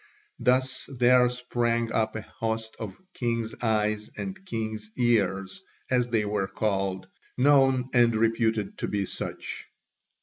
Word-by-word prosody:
Thus 130 +1 +1
there 125 0 +5
sprang 120 -2 0
up 110 -1 0
a 110 - -3
host 115 -2 -4
of 105 -4 -6 0.2
"king's 115 -2 -1
eyes" 105 -2 0
and 190 0 -5
"king's 110 -3 -4
ears," 105 - +1 0.3
as 125 -1 +3
they 115 -3 +1
were 105 -2 -1
called, 95 -3 -1 0.3
known 135 -1 +4
and 120 -2 +5
reputed 110 -2 +1
to - - -1
be 100 -1 -1
such. - - -6
115 Hz, 130 wpm, -27 LUFS, 105-125 Hz, 0.3 s, there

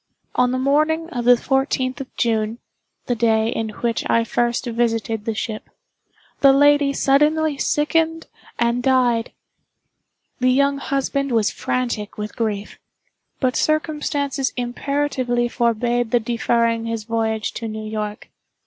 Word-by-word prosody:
On 250 0 +2
the 255 - 0
morning 310 +5 +1
of 240 -2 -3
the 245 0 +7
fourteenth 265 0 0
of 265 - -8
June 220 -1 0 0.5
(the 245 - 0
day 220 -1 +2
in 225 -1 -2
which 230 +2 -2
I 230 - +3
first 240 +2 0
visited 225 -2 -1
the 225 - -2
ship), 215 0 -5 0.7
the 275 - +7
lady 290 +1 +4
suddenly 295 +2 +2
sickened 325 +2 +1 0.3
and 235 +1 +1
died. 245 -3 +2 1.1
The 255 0 +3
young 280 +2 +2
husband 275 0 -1
was 225 -3 +2
frantic 235 -5 -3
with 210 0 -5
grief—but 225 +4 -5
circumstances 295 -3 0
imperatively 250 -1 -1
forbade 240 0 0
the 240 - +3
deferring 230 0 0
his 230 -1 -3
voyage 220 -1 -1
to 230 - -5
New 215 0 -6
York. 215 -1 -5
245 Hz, 130 wpm, -21 LUFS, 225-275 Hz, 1.1 s, the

